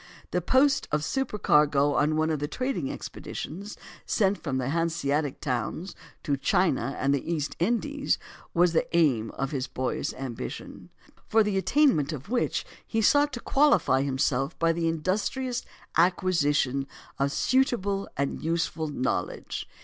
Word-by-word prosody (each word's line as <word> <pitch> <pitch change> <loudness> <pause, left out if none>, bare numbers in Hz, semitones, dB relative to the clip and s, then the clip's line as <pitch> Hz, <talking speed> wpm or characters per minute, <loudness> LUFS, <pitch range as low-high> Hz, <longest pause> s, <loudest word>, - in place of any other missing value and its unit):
The - - 0
post 270 +1 +3
of 150 0 +1
supercargo 150 - +2
on 150 +2 +2
one 155 0 +2
of 155 - -1
the 145 - -2
trading 255 - -2
expeditions 200 +7 -7 0.3
sent 200 -1 +1
out - - -29
from 135 -5 -1
the 130 0 -1
Hanseatic 155 -3 0
towns 135 - -3 0.3
to 140 -2 0
China 140 - +1
and 140 +1 +2
the 140 +4 -2
East 150 -4 -2
Indies 275 - 0 0.3
was 175 0 +3
the 160 - +2
aim 125 -9 +3
of 135 0 -2
his 135 -3 -2
boyish 130 0 -2
ambition, 130 -4 -7 0.4
for 220 0 +4
the 205 -1 -1
attainment 190 - +3
of 145 +4 -8
which 245 0 0 0.2
he 225 - -1
sought 290 +6 +4
to 240 - -4
qualify 280 - +3
himself 135 +1 0
by 165 0 +3
the 165 0 -1
industrious 205 - -1 0.3
acquisition 145 -6 +2 0.3
of 140 0 +1
suitable 205 - +1
and 140 0 -1
useful 165 -1 -1
knowledge. 125 -10 -3
160 Hz, 145 wpm, -27 LUFS, 140-205 Hz, 0.4 s, for